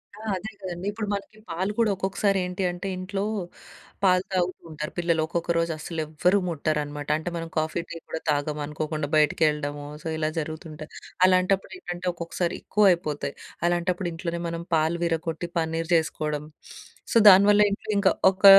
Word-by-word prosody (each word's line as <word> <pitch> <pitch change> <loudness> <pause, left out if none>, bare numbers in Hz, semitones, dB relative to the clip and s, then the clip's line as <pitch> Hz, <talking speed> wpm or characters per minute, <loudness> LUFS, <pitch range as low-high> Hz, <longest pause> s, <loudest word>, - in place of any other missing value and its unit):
ఆ! - - -13 0.2
అదే 210 +4 -5
కదండి. 180 -1 -5
ఇప్పుడు 210 0 -4
మనకి, 200 +2 -5
పాలు 185 +5 -1
కూడా 225 -2 +4
ఒక్కొక్కసారి 195 +1 +1
ఏంటి 180 +1 -3
అంటే, 180 +3 -5
ఇంట్లో 195 +2 -3 0.8
పాలు 185 -1 +5
తాగుతూ 185 0 0
ఉంటారు 150 0 -5
పిల్లలు. 170 -2 +2
ఒక్కొక్క 170 +1 -1
రోజు 165 0 +1
అస్సలు 160 +1 -4
ఎవ్వరూ 175 +6 +2
ముట్టరనమాట. 150 -2 -2
అంటే, 160 +3 -4
మనం 165 0 -5
కాఫీ, 155 +2 0
టీ 170 - -6
కూడా 160 - -4
తాగము. 150 +1 -1
అనుకోకుండా 155 0 -3
బైటికెళ్ళడమో, 150 -1 +2 0.2
సో, - - -4
ఇలా 155 0 0
జరుగుతుంటాయి. 155 0 -7 0.3
అలాంటప్పుడు 185 +1 +2
ఏంటంటే, 175 - -6
ఒక్కొక్కసారి 170 +1 -2
ఎక్కువయిపోతాయి. 170 -9 +2 0.3
అలాంటప్పుడు 175 +1 0
ఇంట్లోనే 170 +1 -4
మనం 170 0 -4
పాలు 160 +2 +2
విరగొట్టి 165 0 -2
పన్నీర్ 165 +1 -2
చేసుకోడం, 150 -2 -1 0.7
సో, - - +6
దానివల్ల 205 +2 +7
ఇంట్లో 215 +2 -3
ఇంకా 195 -1 +4 0.2
ఒక 190 +1 -1
170 Hz, 150 wpm, -26 LUFS, 155-185 Hz, 0.8 s, దానివల్ల